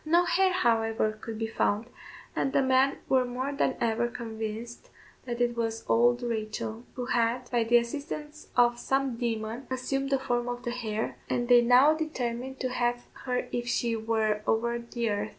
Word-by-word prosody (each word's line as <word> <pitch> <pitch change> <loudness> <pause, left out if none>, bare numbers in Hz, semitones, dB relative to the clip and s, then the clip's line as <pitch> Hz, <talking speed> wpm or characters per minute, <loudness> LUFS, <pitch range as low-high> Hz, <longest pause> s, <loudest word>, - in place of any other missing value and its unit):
No 340 +3 +4
hare, 380 +1 +3
however, 225 -9 +2
could 215 +1 -7
be 225 - -1
found, 220 -1 0 0.5
and 270 - 0
the 275 - +4
men 265 +1 +3
were 260 -1 +4
more 255 +3 -3
than 280 - +1
ever 230 +1 +1
convinced 225 0 -6 0.4
that 240 -1 -4
it 240 -1 +1
was 225 -1 -2
old 240 +1 +3
Rachel, 220 0 -3
who 250 - -3
had, 240 0 0
by 240 -2 +2
the 240 +1 +5
assistance 295 +5 -4
of 240 -1 +4
some 270 -2 0
demon, 230 +1 -3
assumed 270 +1 -2
the 275 - +3
form 245 -2 -1
of 245 0 -5
the 240 - -2
hare, 225 -3 -3
and 240 -1 0
they 245 -1 +8
now 250 +5 +6
determined 265 -5 -3
to 255 - 0
have 245 -1 -1 0.2
her 250 -1 -1
if 240 0 -2
she 235 -1 0
were 220 -1 0
over 235 +1 +1
the 235 0 -3
earth. 205 - -2
240 Hz, 180 wpm, -28 LUFS, 230-260 Hz, 0.5 s, they